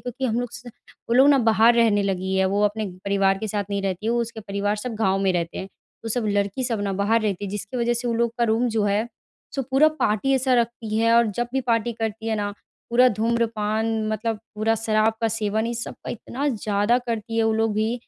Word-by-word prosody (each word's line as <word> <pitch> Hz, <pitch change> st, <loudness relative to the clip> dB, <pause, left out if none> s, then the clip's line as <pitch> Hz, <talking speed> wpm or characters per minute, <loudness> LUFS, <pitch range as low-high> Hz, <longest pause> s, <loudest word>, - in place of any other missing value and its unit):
क्योंकि 250 Hz, +2 st, -5 dB
हम 235 Hz, 0 st, 0 dB
लोग 245 Hz, -, -4 dB
स 240 Hz, 0 st, -9 dB, 0.5 s
वो 235 Hz, -, +1 dB
लोग 265 Hz, +3 st, +6 dB
ना 280 Hz, -, +6 dB
बाहर 225 Hz, 0 st, +4 dB
रहने 220 Hz, -3 st, +3 dB
लगी 190 Hz, -1 st, -1 dB
है। 190 Hz, -, +3 dB
वो 200 Hz, +2 st, 0 dB
अपने 215 Hz, +1 st, 0 dB, 0.2 s
परिवार 195 Hz, -1 st, +2 dB
के 220 Hz, -, -4 dB
साथ 205 Hz, 0 st, -2 dB
नहीं 200 Hz, 0 st, -1 dB
रहती 195 Hz, +2 st, -3 dB
है, 230 Hz, -, +2 dB
वो 240 Hz, -, +1 dB
उसके 230 Hz, -1 st, -5 dB
परिवार 205 Hz, +1 st, -2 dB
सब 235 Hz, +2 st, -5 dB
गाँव 195 Hz, -3 st, +1 dB
में 190 Hz, -1 st, +2 dB
रहते 170 Hz, -1 st, -2 dB
हैं। 190 Hz, -, -6 dB, 0.3 s
तो 225 Hz, -, -5 dB
सब 235 Hz, 0 st, -1 dB
लड़की 205 Hz, +5 st, 0 dB
सब 230 Hz, -4 st, -1 dB
ना 200 Hz, -1 st, -1 dB
बाहर 205 Hz, +4 st, +2 dB
रहती 205 Hz, -2 st, -2 dB
है। 195 Hz, -, -5 dB
जिसकी 205 Hz, +4 st, -5 dB
वज़ह 240 Hz, 0 st, +1 dB
से 240 Hz, +1 st, -2 dB
वो 230 Hz, -, 0 dB
लोग 235 Hz, 0 st, +1 dB
का 240 Hz, -, +3 dB
रूम 230 Hz, +2 st, +1 dB
जो 220 Hz, -2 st, 0 dB
है 205 Hz, +3 st, +1 dB, 0.5 s
सो 270 Hz, -, -1 dB
पूरा 270 Hz, +4 st, +4 dB
पार्टी 270 Hz, -4 st, 0 dB
ऐसा 260 Hz, -1 st, +2 dB
रखती 230 Hz, -2 st, -1 dB
है 230 Hz, +1 st, +3 dB
और 235 Hz, -1 st, +5 dB
जब 240 Hz, 0 st, -1 dB
भी 265 Hz, -, +1 dB
पार्टी 235 Hz, -1 st, 0 dB
करती 225 Hz, 0 st, -4 dB
है 220 Hz, -, +1 dB
ना, 205 Hz, -1 st, -2 dB, 0.4 s
पूरा 250 Hz, +2 st, +5 dB
धूम्रपान 220 Hz, -1 st, 0 dB, 0.2 s
मतलब 220 Hz, +1 st, -2 dB, 0.2 s
पूरा 220 Hz, +1 st, +1 dB
शराब 220 Hz, 0 st, +1 dB
का 225 Hz, -, +2 dB
सेवन 220 Hz, 0 st, -1 dB
ये 235 Hz, -, -2 dB
सब 230 Hz, -, -5 dB
का -, -, -4 dB
इतना 260 Hz, +5 st, -4 dB
ज़्यादा 215 Hz, 0 st, +1 dB
करती 230 Hz, -2 st, -4 dB
है 225 Hz, -, +3 dB
वो 220 Hz, -, +2 dB
लोग 220 Hz, 0 st, +1 dB
भी, 220 Hz, +2 st, 0 dB
225 Hz, 245 wpm, -23 LUFS, 205-235 Hz, 0.5 s, लोग